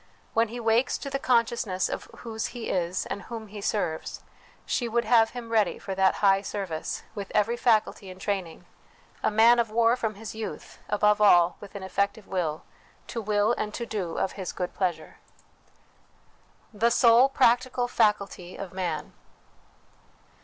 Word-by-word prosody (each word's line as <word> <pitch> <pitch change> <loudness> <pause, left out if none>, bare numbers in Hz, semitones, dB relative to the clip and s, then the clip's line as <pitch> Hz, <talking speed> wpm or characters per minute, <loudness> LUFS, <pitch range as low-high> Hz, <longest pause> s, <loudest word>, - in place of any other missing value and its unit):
When 230 +1 +3
he 240 +3 -7
wakes 230 +2 +2
to 275 - -7
the 275 - -1
conscious 235 -3 +2
ness 185 -1 0
of - - -5
whose 225 -2 -6
he 235 - -5
is 180 0 -1
and 200 - -5
whom 220 +1 -8
he 205 0 -8
serves, 175 -6 -2 0.4
she 240 -2 -1
would 235 +1 0
have 225 -1 +5
him 235 -2 -8
ready 220 -2 +2
for 195 - -6
that 190 0 +3
high 195 0 +5
service, 190 -6 -4
with 200 -3 -6
every 225 +3 +2
faculty 220 -5 +1
in 185 - -10
training 190 -4 -4 0.6
a - - +2
man 230 +3 +5
of 230 -2 +1
war 230 +2 +3
from 220 -4 -3
his 215 0 -8
youth; 220 0 -7
above 210 0 +3
all, 175 -4 +6
with 205 -1 -12
an 200 - -6
effective 200 +2 -1
will, 165 -5 -2 0.5
to 230 - -3
will 210 +1 +2
and 210 -1 -3
to 235 - -4
do 195 -7 -4
of 190 - 0
His 190 -3 -5
good 180 -1 -4
pleasure. 180 -4 -3 1.6
The 225 +3 +2
sole 235 +2 +5
Practical 250 -1 +2
Faculty 200 -6 0
of 195 -2 -7
Man. 170 -5 -3
210 Hz, 165 wpm, -27 LUFS, 190-230 Hz, 1.6 s, all